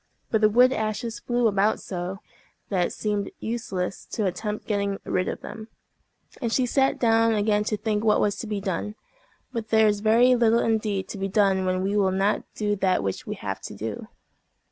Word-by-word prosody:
But 220 - +2
the 215 - +6
wood 250 +4 +5
ashes 220 0 -3
flew 240 -1 0
about 205 +1 +2
so, 185 +2 -5 0.5
that 180 -3 +1
it - - -9
seemed 205 -2 -2
useless 195 -5 -3
to 215 - -2
attempt 210 +3 -3
getting 200 -2 -1
rid 185 0 0
of - - -4
them, 220 0 -8 0.7
and 235 -3 -1
she 255 +2 +2
sat 270 +2 +2
down 225 -1 +3
again 210 0 +2
to 215 - -1
think 210 0 -1
what 215 -1 +4
was 205 -1 +1
to 230 - -5
be 210 -1 -2
done. 195 +2 -3 0.6
But 225 -3 -4
there 220 0 +5
is 205 -1 +1
very 230 +4 +5
little 235 -2 +4
indeed 215 -4 0
to 200 - -6
be 195 - -1
done 195 -2 +2
when 185 0 0
we 200 +2 0
will 200 -2 +3
not 195 +2 +1
do 205 -1 0
that 185 - +1
which 95 -1 -3
we - - -3
have - - -5
to - - -8
do. - - -5
210 Hz, 200 wpm, -25 LUFS, 195-225 Hz, 0.7 s, the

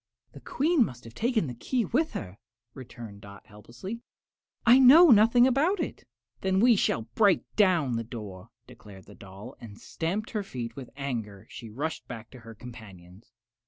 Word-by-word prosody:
"The 140 - -12
Queen 290 - +1
must 125 - -7
have 115 - -12
taken 230 - 0
the 125 - -6
key 235 - -2
with 315 - -1
her," 90 +4 -7 0.3
returned 120 -5 -11
Dot, 100 0 -13
helplessly; 120 - -10 0.6
"I 245 +2 +7
know 290 +5 +8
nothing 230 +3 +6
about 295 +10 +1
it." 325 - -5 0.3
"Then 190 0 0
we 240 +2 +5
shall 115 - 0
break 205 -5 +3
down 170 - +2
the 115 - -3
door," 105 -4 -9 0.2
declared 105 -6 -15
the 105 - -15
doll, 100 +7 -12
and 110 -3 -12
stamping 195 +9 -4
her 215 - -1
feet 125 -12 -7
with 130 -3 -9
anger 115 -8 -5
she 115 - -9
rushed 145 +9 -5
back 110 -1 -9
to 130 - -13
her 115 -1 -12
companions. 105 -3 -13
125 Hz, 170 wpm, -27 LUFS, -, 0.6 s, know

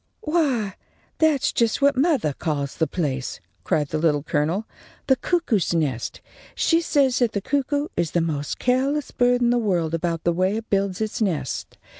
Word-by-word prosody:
_ - - -47 0.2
"Why, 270 - 0 0.4
that's 310 -4 +3
just 230 -2 +1
what 280 0 +4
mothah 265 - +2
calls 140 -2 -2
the 160 - +1
place," 135 -7 -3 0.2
cried 145 - 0
the 155 - -1
Little 150 -3 +2
Colonel, 165 +6 0 0.4
"the 265 - +4
cuckoo's 245 - 0
nest! 135 -8 -2 0.3
She 330 0 +3
says 275 -6 +2
that 240 -3 +2
the 200 - 0
cuckoo 285 +5 -1
is 170 - 0
the 175 - +1
most 150 -3 -2
careless 270 +3 0
bird 245 0 +2
in 240 - +3
the 245 - +2
world 175 -7 0
about 165 0 -1
the 170 - +2
way 185 +4 +1
it 225 - -8
builds 195 0 0
its 220 +1 -2
nest. 170 -11 -2
200 Hz, 180 wpm, -23 LUFS, 160-265 Hz, 0.4 s, what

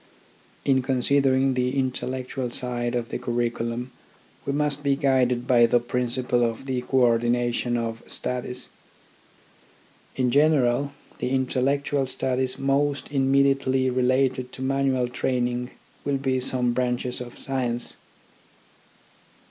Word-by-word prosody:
In 135 -1 +3
considering 135 +1 +2
the 125 +1 0
intellectual 130 -1 -2
side 120 0 -1
of 120 -1 -2
the - - -3
curriculum 120 0 -2 0.6
we - - +1
must 145 0 0
be 140 -1 +2
guided 130 -3 +2
by 120 -2 +5
the 120 - +3
principle 125 0 0
of 115 +2 -2
the 130 -2 -1
co 130 +1 +1
ordination 120 0 +2
of 115 -1 -3
studies. 125 0 -2 1.5
In 125 -2 +1
general, 140 -1 +3 0.3
the - - -1
intellectual 135 +1 0
studies 130 0 0
most 140 +1 0
immediately 135 -1 +2
related 130 0 +1
to 130 - -6
manual 135 -2 +1
training 125 0 -1 0.3
will 140 -1 0
be 135 -1 0
some 125 -1 0
branches 125 0 -1
of 120 -1 -9
science. 125 -3 -2
130 Hz, 115 wpm, -25 LUFS, 120-135 Hz, 1.5 s, by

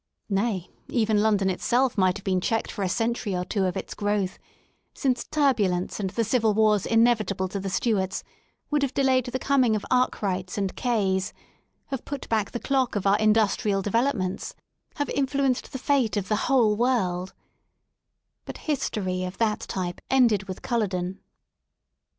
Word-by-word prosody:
Nay, 195 -2 -1 0.2
even 220 -3 +2
London 205 -3 +2
itself 240 +7 +1
might 185 -1 +2
have 200 - -12
been 185 -2 0
checked 225 +4 -1
for 210 - -6
a 190 - 0
century 225 -1 -1
or 180 0 -2
two 195 0 0
of 180 - -1
its - - -5
grow 205 -1 0
th, 185 - -9 0.6
since 255 -4 0
turbulence 215 - +1
and 195 -2 -1
the 230 +5 -1
civil 220 -1 +2
wars 210 -2 +3
inevitable 225 -5 +2
to 200 - -4
the 195 0 -4
Stuarts 190 -2 0 0.5
would 295 -1 +2
have 280 -1 -1
delayed 260 -2 +3
the 245 - -2
coming 260 -4 +2
of 210 - -3
Arkwrights 195 -8 0
and 195 -2 -1
Kays, 195 -6 0 0.6
have 270 -3 -4
put 285 -1 -6
back 215 -3 +1
the 240 - -4
clock 265 -3 0
of 200 - -2
our 200 +1 +4
industrial 210 -2 +2
de 205 - -3
velopments, 230 -6 0 0.4
have 290 -1 -2
influenced 275 -2 0
the - - -4
fate 260 -5 +1
of 195 -2 -3
the 215 0 0
whole 235 -6 +4
world 190 -7 0 1.1
But - - -7
history 195 - -1
of 185 0 -5
that 220 -2 +1
type 180 -2 -4
ended 235 -7 +3
with 185 -1 -7
Culloden. 190 -6 -1
215 Hz, 170 wpm, -26 LUFS, 190-245 Hz, 1.1 s, our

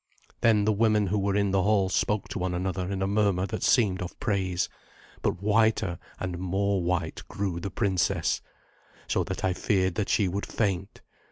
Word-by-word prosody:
Then 110 -3 +4
the 110 - +3
women 105 -1 +3
who 100 +2 0
were 100 0 0
in 100 -1 +2
the 95 0 +3
hall 100 -1 +3
spoke 105 +2 0
to - - -4
one 90 0 -1
another 95 +1 -2
in 95 -1 -1
a - - +1
murmur 100 -2 +2
that 95 - -4
seemed 100 -6 +3
of 90 - -6
praise; 95 -5 0 0.5
but 90 - -1
whiter 110 -4 +2 0.2
and 90 -2 -3
more 95 +1 0
white 85 -2 -1
grew 95 -4 -3
the 100 +3 -4
princess, 95 -1 0 0.7
so - - +1
that - - -5
I 95 - +2
feared 95 0 +1
that 100 +3 -2
she 100 - +3
would 100 +3 -3
faint. 95 -2 -2
95 Hz, 185 wpm, -27 LUFS, 90-105 Hz, 0.7 s, Then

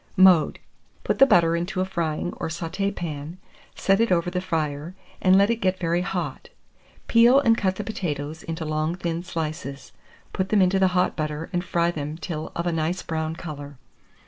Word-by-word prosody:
Mode. 185 -5 +6 0.5
Put - - -1
the 270 - +8
butter 170 -7 +4
into 180 +3 -2
a 185 - +1
frying 170 -2 -2
or 165 - -3
sauté 170 +4 -2
pan, 155 0 -5 0.4
set 195 +1 +2
it 230 - +2
over 175 0 +2
the 180 0 -1
fire, 160 -2 -3 0.3
and 185 0 +5
let 200 +3 +4
it 235 - 0
get 185 0 +1
very 170 0 0
hot; 180 -1 -4 0.6
peel, 240 +3 +6
and 230 -5 +4
cut 190 -4 0
the 210 - -4
potatoes 155 -7 -4
into 165 -1 -5
long 155 +2 -1
thin 170 -2 -3
slices; 155 -5 -5 0.4
put 190 0 -1
them 210 - +3
into 190 0 +3
the 190 - +5
hot 180 - +2
butter, 155 +1 -4
and 175 0 0
fry 170 -1 +1
them 150 -1 -5
till 160 -3 -5
of 170 - -2
a 175 - +1
nice 165 +3 -1
brown 160 0 -3
colour. 145 -4 -8
170 Hz, 190 wpm, -24 LUFS, 155-185 Hz, 0.6 s, the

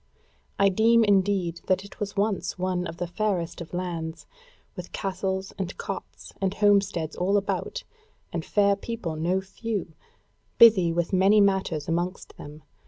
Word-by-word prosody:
I 200 0 +5
deem 225 +4 +4
indeed 195 -4 +1
that 190 +1 +1
it 200 - -14
was 200 -1 -4
once 200 -1 -1
one 180 -1 -1
of 165 - -8
the 175 - -2
fairest 180 -2 -2
of 165 - -8
lands, 170 -2 -4 0.5
with 180 -2 -8
castles 190 0 -3
and 185 -1 -4
cots - - -7
and 195 0 0
homesteads 200 -6 +2
all 195 +3 +1
about, 350 - -2 0.5
and 170 - -2
fair 200 +2 +3
people 200 -6 -5
no 175 +4 0
few, 195 -3 -5 0.6
busy 210 -8 +7
with 170 +2 -1
many 195 +3 +5
matters 190 -7 +1
amongst 175 +3 -3
them. 150 +1 -11
190 Hz, 150 wpm, -26 LUFS, 175-200 Hz, 0.6 s, busy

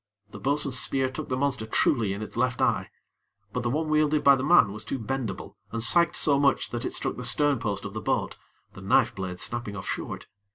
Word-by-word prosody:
The - - -9
bo'sun's 140 -2 +1
spear 135 -1 0
took 130 - -7
the 130 - -1
monster 135 -5 -1
truly 110 -2 +2
in 100 +2 -4
its - - -9
left 130 -1 0
eye; - - +1 0.6
but 125 - -2
the 120 - -1
one 155 +5 -1
wielded 155 -1 +2
by 140 0 +7
the 130 - -3
man 155 - +5
was 105 +1 -5
too - - -4
bendable, 115 -4 -5
and 115 -1 -1
sagged 170 +9 +5
so 140 -2 +3
much 140 -1 +1
that 120 -1 -4
it - - -3
struck - - -3
the 125 - -6
stern 145 +2 +2
post 100 -3 -3
of 100 - -6
the 110 - -5
boat, - - -1 0.4
the - - -11
knife - - +2
blade 90 -2 -6
snapping 120 -4 -4
off 95 - -7
short. - - -5
130 Hz, 230 wpm, -26 LUFS, 110-140 Hz, 0.6 s, by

